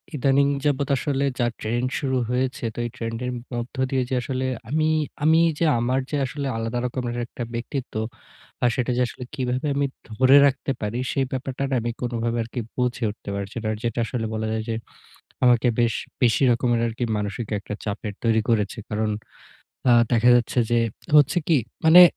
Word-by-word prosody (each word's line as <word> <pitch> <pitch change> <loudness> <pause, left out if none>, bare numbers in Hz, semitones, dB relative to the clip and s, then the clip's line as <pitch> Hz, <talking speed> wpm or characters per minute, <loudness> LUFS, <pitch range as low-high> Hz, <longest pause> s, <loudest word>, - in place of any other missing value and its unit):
ইদানিং 140 +1 +3 0.2
যাবত 145 -1 +1
আসলে 140 0 0
যা 120 - +3
ট্রেন্ড 120 +3 -1
শুরু 130 -2 0
হয়েছে। 125 +1 -1
তো - - -20
এই 120 - -2
ট্রেন্ড 115 -1 -4
এর 125 - -1 0.2
মধ্য 120 +3 -4
দিয়ে 130 -1 +1
যে 130 - 0
আসলে 130 0 -2 0.2
আমি 155 +3 +2 0.4
আমি 160 +1 +5 0.2
যে 165 - +3
আমার 125 +3 +1
যে 150 - -1
আসলে 140 +2 -4
আলাদা 115 +2 -2
রকমের 120 -1 -3
একটা 120 0 -6
ব্যক্তিত্ব 125 +3 -4 0.7
আ - - +5
সেটা 125 0 0
যে 125 - +2
আসলে 125 - -8
কিভাবে 130 +1 -1
আমি 140 0 +2 0.2
ধরে 130 +5 +5
রাখতে 140 0 +1
পারি? 105 +3 -2
সে - - -1
ব্যাপারটা 130 +1 -3
না 135 - +1
আমি 120 - -2
কোনোভাবে 120 -1 -1
আরকি 120 +2 -6 0.2
বুঝে 125 -1 -1
উঠতে 105 - -11
পারছি 100 +1 -5
না। 110 - -3
আর 110 - -3
যেটা 120 0 -1
আসলে 115 0 -3
বলা 110 0 -2
যায় 110 0 -1
যে 115 - 0 0.7
আমাকে 120 -1 +5
বেশ 115 -1 +3 0.3
বেশি 125 +2 +4
রকমের 120 0 +2
আরকি 115 +2 -3
মানসিক 105 +2 -3
একটা 105 - -6
চাপের 105 0 -4
তৈরি 110 -1 +3
করেছে। 105 -2 +1
কারণ 110 0 0 0.8
আ - - +7 0.2
দেখা 120 +1 +5
যাচ্ছে 120 +1 +2
যে 120 - +4 0.4
হচ্ছে 145 +4 +5
কি? 160 -4 +5 0.3
মানে 175 +3 +10
125 Hz, 185 wpm, -24 LUFS, 115-135 Hz, 0.8 s, মানে